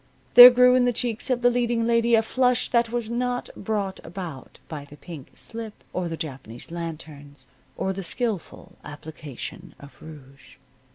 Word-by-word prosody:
There 245 0 +13
grew 250 0 +5
in 250 -1 +4
the 245 - +1
cheeks 235 0 -3
of 245 -1 0
the 245 - +5
leading 240 -1 0
lady 235 0 +3
a 225 - +3
flush 250 +2 +1
that 235 -1 +2
was 240 -2 -2
not 245 +1 -2
brought 200 -2 -3
about 170 -7 -8
by 150 -3 -7
the 145 +1 -15
pink 155 -4 -11
slip, 225 -2 -7
or 180 -2 -2
the 165 - -5
Japanese 130 -4 -8
lanterns, 150 -5 -8 0.3
or 190 - -1
the 195 - -5
skillful 195 -2 -4
application 150 -2 -9
of 140 0 -14
rouge. 140 -3 -14
195 Hz, 165 wpm, -24 LUFS, 155-240 Hz, 0.3 s, There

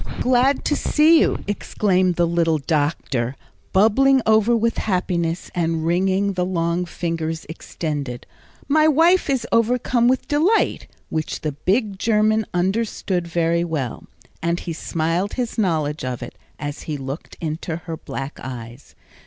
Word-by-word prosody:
"Glad 255 +2 +2
to 295 - +2
see 315 +3 +4
you!" - - +1
exclaimed 185 -3 +1
the 175 - +3
little 165 -1 +2
doctor, 145 -5 -1 0.4
bubbling 265 +7 +4
over 220 +2 +4
with 230 +1 0
happiness, 180 -4 -1
and 165 -2 -1
wringing 190 +3 +1
the 180 -1 0
long 175 -1 0
fingers 165 -2 -3
extended. 145 -5 -5 0.4
"My 310 +2 +4
wife 330 +3 +4
is 265 -3 0
overcome 240 +1 +2
with 255 +1 +1
delight," 325 +9 +2 0.2
which 155 -1 -3
the 155 - -1
big 195 - -1
German 215 0 +2
understood 185 -1 -1
very 170 0 +1
well; 150 -8 -4 0.3
and 170 +1 0
he 170 - -4
smiled 165 +4 -1
his 245 -2 -3
knowledge 155 -7 0
of 125 -1 -4
it, - - -9 0.2
as 145 0 -5
he 150 - -2
looked 135 +3 -7
into 160 0 -3
her 165 0 -6
black 135 -2 -7
eyes. 120 0 -9
175 Hz, 140 wpm, -21 LUFS, 160-220 Hz, 0.4 s, see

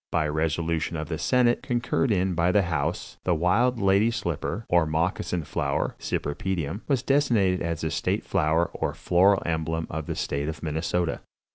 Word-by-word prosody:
By 80 -2 +1
resolution 80 +2 -1
of 80 +1 -5
the 80 - -3
senate, 125 -2 +3
concurred 120 +2 0
in 95 -2 +1
by 85 +1 +2
the 100 +1 +3
house 85 -1 -2
(?), - - -69
the 90 - +2
Wild 115 +9 +2
Lady 100 +2 +4
Slipper, 105 - -3
or 85 -2 +3
Moccasin 85 +2 -1
Flower 70 -1 -2
(Cypripedium) 85 +4 -3
was 135 -4 +1
designated 115 -10 +2
as 85 -2 -2
the 80 - -2
state - - -1
flower 80 +2 +1
or - - -2
floral 95 +3 +3
emblem 80 0 -1
of 80 -2 -4
the - - -3
State 70 +2 -2
of 80 +1 -7
Minnesota." 80 +2 -1
85 Hz, 170 wpm, -26 LUFS, 80-100 Hz, -, Lady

